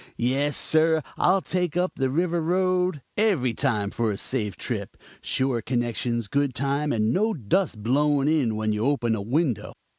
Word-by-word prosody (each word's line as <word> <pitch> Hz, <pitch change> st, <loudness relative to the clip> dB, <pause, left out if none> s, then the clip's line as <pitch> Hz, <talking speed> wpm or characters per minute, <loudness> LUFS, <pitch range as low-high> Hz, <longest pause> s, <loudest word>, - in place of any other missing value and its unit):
Yes, 135 Hz, +4 st, 0 dB
sir, 160 Hz, 0 st, +3 dB
I'll 185 Hz, +2 st, +3 dB
take 180 Hz, -4 st, -1 dB, 0.2 s
the 135 Hz, -1 st, 0 dB
River 170 Hz, +4 st, 0 dB
Road 180 Hz, -2 st, 0 dB
every 180 Hz, -, +2 dB
time 105 Hz, -2 st, 0 dB
for 115 Hz, -1 st, -1 dB
a 100 Hz, -, -2 dB
safe 105 Hz, -4 st, -2 dB
trip, -, -, -5 dB, 0.2 s
sure 130 Hz, -3 st, -1 dB
connections, 120 Hz, -1 st, -2 dB
good 140 Hz, +1 st, 0 dB
time, 140 Hz, +2 st, -1 dB
and 110 Hz, 0 st, +1 dB
no 215 Hz, +3 st, +1 dB
dust 125 Hz, -, -1 dB
blowing 145 Hz, +3 st, +2 dB
in 145 Hz, -8 st, +1 dB
when 110 Hz, 0 st, -1 dB
you 105 Hz, +1 st, -2 dB
open 125 Hz, -4 st, +1 dB
a 110 Hz, -, -2 dB
window. 130 Hz, -, -1 dB
135 Hz, 160 wpm, -25 LUFS, 115-160 Hz, 0.2 s, sir